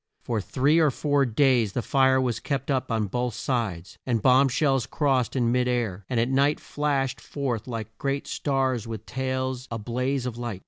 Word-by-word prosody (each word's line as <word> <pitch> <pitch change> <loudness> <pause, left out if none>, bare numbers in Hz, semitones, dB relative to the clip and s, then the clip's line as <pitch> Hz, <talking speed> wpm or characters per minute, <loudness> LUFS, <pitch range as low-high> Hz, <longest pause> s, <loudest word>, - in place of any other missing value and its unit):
For 115 -3 -1
three 140 - +2
or 155 -2 +5
four 145 0 +1
days 120 -3 +2
the 125 - -2
fire 130 -1 +3
was 125 -3 0
kept 140 -1 -2
up 130 -3 -1
on 110 -2 +1
both 120 +3 -2
sides, 100 -9 -3
and 120 -3 0
bomb 130 +4 +5
shells 135 -2 +1
crossed 135 -5 0
in 120 -3 +2
mid 125 0 +2
air, 110 -6 -1
and 125 - 0
at 115 - +2
night 140 +3 +2
flashed 140 -3 -1
forth 130 -6 -3
like 110 -2 -6
great 140 0 -1
stars 130 -5 -1
with 110 -1 -6
tails 130 0 -3
a 115 - -3
blaze 125 +4 -2
of 120 -2 -4
light. 120 -6 -4
125 Hz, 190 wpm, -26 LUFS, 115-135 Hz, -, or